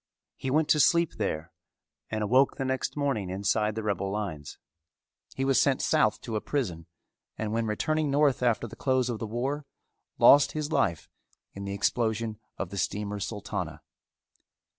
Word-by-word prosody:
He 135 - -4
went 150 +3 +2
to 150 - +4
sleep 170 +2 +4
there 85 -5 -2 0.6
and 110 -1 -2
awoke 130 +6 +3
the 135 - -2
next 130 +2 -2
morning 135 -10 -1
inside 105 +3 0
the 110 - -3
rebel 100 -2 -1
lines. 95 -8 -4 0.8
He 135 - -1
was 135 -1 +4
sent 135 -2 +2
south - - +2
to 115 - -5
a 105 - 0
prison 90 - -3 0.5
and 110 -1 -3
when 115 0 0
returning 155 +8 0
north 140 -2 +3
after 120 -1 +2
the - - -11
close 130 -2 +1
of 115 - -4
the 110 - -4
war 135 +6 -3 0.5
lost 145 0 +7
his 150 0 -3
life 100 - +1 0.5
in 100 0 -7
the 100 0 -3
explosion 110 +1 0 0.2
of 90 - -4
the 100 - -4
Steamer 105 +3 -2
Sultana. 105 +1 -4
115 Hz, 165 wpm, -28 LUFS, 100-135 Hz, 0.8 s, lost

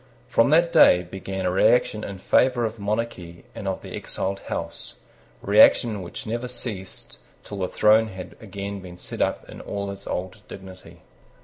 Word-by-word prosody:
From 115 +3 +3
that 170 +3 +4
day 90 0 +7
began 95 +1 -5
a 90 - +1
reaction 105 +2 +3
in 100 - -6
favour 120 +5 +2
of 110 0 -5
monarchy 100 -5 -4
and 110 -3 -7
of 95 - -3
the - - -9
exiled 95 +1 -3
house, - - -5 0.5
reaction 105 +1 +5
which 90 - -7
never 120 +3 -3
ceased 110 -6 -7 0.2
till 100 - -7
the 95 - 0
throne 110 +3 +4
had 95 -3 -9
again 100 -1 -6
been 90 -2 -11
set - - -5
up - - -1
in - - -10
all 100 -1 -4
its 100 0 -10
old 95 +2 -4
dignity. 95 -1 -12
100 Hz, 170 wpm, -24 LUFS, 95-110 Hz, 0.5 s, day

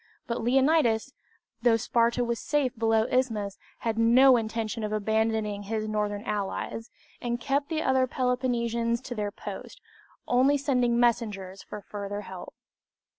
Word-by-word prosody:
But 235 0 -3
Leonidas, 260 -1 +2 0.5
though 235 -2 +4
Sparta 235 +1 +1
was 235 -1 -2
safe 280 -4 0
below 225 -1 +2
the 250 - -2
Isthmus, 210 -6 -3 0.2
had 225 -1 -1
no 250 +3 +6
intention 225 -1 -2
of 210 - -2
abandoning 220 -1 0
his 215 +1 -3
northern 210 -1 -2
allies, 210 +2 -3 0.3
and 240 0 -2
kept 280 +3 -1
the 320 -1 -1
other 260 -1 +2
Peloponnesians 235 -2 0
to 260 - -6
their 210 -3 -2
posts, - - -8 0.5
only 265 +4 +4
sending 250 -4 +1
messengers 210 -6 0
for 210 - -8
further 205 0 -5
help. - - -9
230 Hz, 140 wpm, -27 LUFS, 215-250 Hz, 0.5 s, no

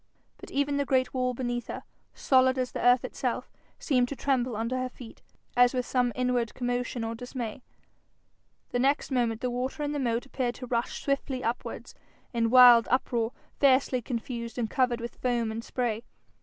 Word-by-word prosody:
But - - -10
even 280 0 0
the 285 - +2
great 255 -1 +1
wall 255 -1 0
beneath 240 -1 -3
her, - - -6 0.3
solid 260 -1 +3
as 255 -1 -1
the - - -4
earth 245 0 +5
itself, - - -3 0.3
seemed 250 -4 +1
to 280 - -4
tremble 255 -2 0
under 230 +4 -2
her 255 0 -2
feet, 245 -2 -13 0.3
as 245 +1 +5
with 250 -1 0
some 245 -1 +1
inward 250 -2 0
commotion 245 -1 -2
or 225 0 -3
dismay. 245 0 -6 1.1
The 245 - 0
next 275 +3 +1
moment 235 -3 0
the 250 - -1
water 255 +4 -3
in 290 - -1
the 295 - -2
moat 235 -2 0
appeared 255 -3 -2
to 250 - -7
rush 235 -1 -2
swiftly 275 -2 -1
upwards, 235 +2 -4 0.4
in 230 -1 +1
wild 245 -1 +8
uproar, 240 -2 +1 0.3
fiercely 260 -2 +3
confused, 235 0 -5
and 235 -2 0
covered 250 0 +1
with 235 0 -7
foam 240 -3 0
and 225 +1 -5
spray. 235 -3 -2
250 Hz, 180 wpm, -28 LUFS, 235-260 Hz, 1.1 s, wild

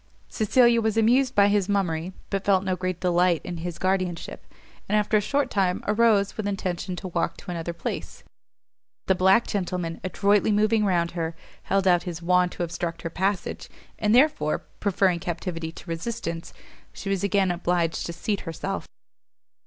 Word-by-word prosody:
Cecilia 235 +1 +4
was 220 0 0
amused 250 +4 +3
by 200 0 +6
his 205 -1 +1
mummery, 180 -4 0 0.2
but 195 -1 -1
felt 195 -1 +3
no 190 -1 0
great 185 -1 -3
delight 175 -2 +2
in 175 - -5
his 170 0 -5
guardianship, 185 -2 -2 0.4
and, 210 - +2
after 210 0 +2
a 210 - +5
short 280 +4 0
time, 185 -3 +1
arose, 210 -2 +3
with 215 -2 -3
intention 185 -2 -3
to 185 +1 -6
walk 170 -1 -1
to 185 - -8
another 170 -1 -3
place; 170 - -6 0.8
but 190 - +3
the - - -6
black 190 +5 +5
gentleman, 180 -4 -3
adroitly 200 +3 +2
moving 215 +1 +3
round 170 -3 +1
her, 165 -1 -3 0.3
held 195 -1 0
out 175 -2 +5
his 175 -2 -5
wand 180 +1 +2
to - - -3
obstruct 170 0 -4
her 165 - -4
passage, 190 +2 -2 0.3
and 210 +1 +3
therefore, 270 - +2
preferring 190 -3 +2
captivity 170 -2 -4
to 170 - -13
resistance, 170 -1 -4 0.4
she - - -9
was 195 -1 0
again 195 -2 +2
obliged 175 -1 0
to - - -4
seat 200 +4 -2
herself. 185 +4 -4
185 Hz, 170 wpm, -25 LUFS, 175-205 Hz, 0.8 s, by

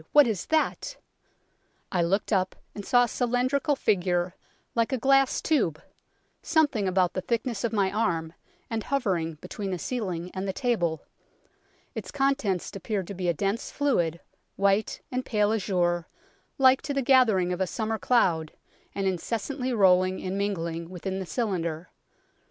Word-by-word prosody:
what 295 -1 +8
is 215 -7 -2
that? 320 +9 0 0.3
' - - -43
" - - -42
I 180 - +1
looked 190 +6 +1
up, 185 -1 +1 0.2
and 205 - -7
saw 245 +3 +4
a - - +1
cylindrical 255 +5 +1
figure, 180 -6 +1 0.4
like 230 +1 +1
a 260 - +1
glass 270 +2 +3
tube, 225 - +1 0.6
something 285 - +2
about 185 -1 +2
the 185 - -2
thickness 235 0 -2
of 235 - 0
my 200 -4 +1
arm, 170 -7 -1 0.3
and 225 -1 -2
hovering 190 - -1
between 200 -2 -5
the 185 - -2
ceiling 180 -6 -3
and 190 +1 -3
the 190 - -1
table; 180 - 0 0.9
its - - -6
contents 270 - 0
appeared 195 -1 -2
to - - -4
be 180 -2 -2
a - - +3
dense 200 +7 -1
fluid, 175 - 0 0.4
white 200 +2 +1
and 255 0 -1
pale 210 -3 +1
azure, 175 -5 0 0.5
like 260 0 +5
to 285 - -4
the 275 - +1
gathering 220 -9 +4
of 180 - -4
a 190 - +1
summer 220 +3 -2
cloud, 170 -11 +2 0.4
and 195 - -1
incessantly 230 - -2
rolling 185 -4 +4
and 185 +1 -3
mingling 170 -5 -2
within 185 +1 -4
the 190 - -5
cylinder. 175 -8 -2
200 Hz, 160 wpm, -27 LUFS, 180-245 Hz, 0.9 s, what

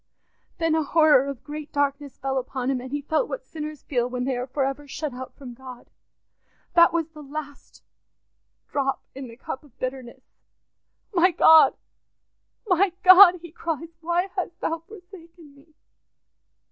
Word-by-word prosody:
Then 330 -2 0
a 320 - +2
horror 310 -3 +4
of 275 -3 -7
great 300 0 -8
darkness 285 -1 -2
fell 270 0 -2
upon 260 0 -3
him, 255 -2 -2
and 255 +1 -9
he 290 0 -3
felt 315 - 0
what - - -6
sinners 305 -2 -8
feel 245 -3 -1
when 250 0 -3
they 260 0 -1
are 245 +1 -4
for 270 +1 -1
ever 275 +2 -4
shut 290 0 -5
out 255 +1 -9
from 260 -4 -10
God. 255 0 -12 0.8
That 340 -1 +6
was 330 -1 -1
the 310 -2 -13
last 290 0 -9 0.8
drop 270 -1 -2
in 270 -1 -8
the 230 0 -13
cup 265 +1 -7
of 285 -5 -22
bitterness. 255 -1 -6 0.9
'My 365 0 +4
God, 320 -2 +6 0.9
my 375 -2 +2
God!' 365 -1 +8
he 345 - -10
cries, 330 -1 -4
'why 345 +3 0
hast 350 -2 -4
Thou 330 0 -2
forsaken 340 -4 -15
me? 295 +2 -23
295 Hz, 160 wpm, -24 LUFS, 265-335 Hz, 0.9 s, God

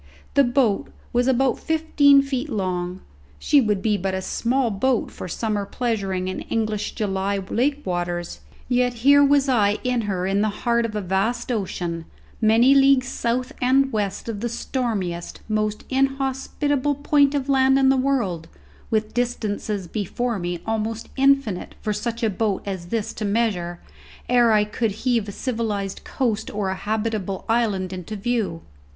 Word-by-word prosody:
The 280 - +5
boat 245 -5 +1 0.2
was 245 +1 +2
about 265 -1 +2
fifteen 295 -3 +4
feet 275 +1 -3
long; 185 -4 -2 0.4
she 280 - +4
would 210 -4 0
be 215 -2 +2
but 190 0 -2
a 190 - -2
small 240 +4 0
boat 240 +4 0
for - - -7
summer 210 +3 -2
pleasuring 200 -5 -2
in 185 - -3
English 215 -2 -2
July 200 -1 -1
lake 265 +9 -1
waters, 175 -1 -3 0.3
yet 245 0 +1
here 285 +1 +7
was 280 0 +4
I 210 -5 +3
in 250 -2 +1
her 185 -2 -1
in 195 +1 +1
the 215 - +2 0.2
heart 235 -1 +2
of 215 - -8
a 210 - -1
vast 200 +7 -1
ocean, 175 -6 -3 0.4
many 230 +4 +5
leagues 270 -2 +5
south 250 +1 -2
and 270 +2 +3
west 205 -1 -2
of 220 -3 -4
the 240 +3 -2
stormiest, 215 -8 -3
most 215 -1 -1
inhospitable 270 +1 0
point 285 0 +3
of 275 -1 -1
land 265 -1 +4
in 270 -1 +4
the 270 - +4
world, 255 -11 0 0.4
with 215 -1 0
distances 215 -5 -2
before 220 +4 -2
me 175 -1 -3
almost 225 0 -2
infinite 275 -8 +2
for 210 - -2
such 230 +3 -3
a 220 - +3
boat 205 0 -1
as 190 -3 -5
this 220 +1 -2
to - - -5
measure 200 -5 0 0.5
ere 240 -2 +4
I 210 -1 +4
could 210 0 -1
heave 235 -4 +2
a - - -4
civilized 210 -5 -3
coast 225 -5 -1
or 205 -2 -2
a - - 0
habitable 210 -2 -2
island 210 -5 0
into 185 +3 -6
view! 210 - -2
225 Hz, 160 wpm, -23 LUFS, 195-255 Hz, 0.5 s, here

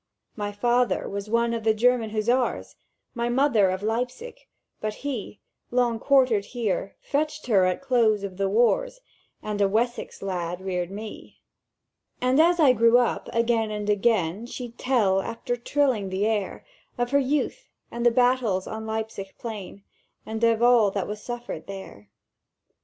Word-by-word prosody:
"My 205 -1 -3
father 240 +4 +1
was 200 +1 -5
one 235 +1 +1
of 230 -1 -3
the 220 0 +3
German 240 0 +2
Hussars, 235 +4 0 0.4
My 235 -1 -2
mother 240 -6 +3
of 185 +2 -3
Leipzig; 250 - -3 0.4
but 215 0 -3
he, 250 -7 -5 0.3
Long 240 -2 +1
quartered 255 -7 +3
here, 210 -5 -3
fetched 305 +1 -2
her 200 -6 +4
at 185 +7 -1
close 230 -6 +2
of 190 -2 -6
the 195 -1 0
wars, 245 - +2 0.4
And 210 -1 -3
a 200 - +5
Wessex 235 0 -2
lad 180 -2 -3
reared 180 -2 -3
me. 210 +2 -9 0.8
"And 255 +3 +2
as 345 +1 +3
I 280 -5 +6
grew 230 0 +5
up, 245 -2 0
again 230 -1 +1
and 210 -1 -2
again 205 -1 +1
She'd 240 -1 -8
tell, 210 -7 +2
after 235 +4 -3
trilling 245 -5 0
that 190 - -4
air, 215 -3 -2 0.3
Of 245 +1 -1
her 280 - +4
youth, 280 +2 -1 0.2
and 235 0 -4
the 240 - +6
battles 240 -6 +2
on 220 0 -6
Leipzig 220 -3 -5
plain 205 -4 -7 0.4
And 220 +1 -5
of 230 0 +3
all 240 -4 +5
that 195 -1 -3
was 210 0 -6
suffered 240 +1 -6
there! 190 - -9
225 Hz, 160 wpm, -25 LUFS, 205-245 Hz, 0.8 s, I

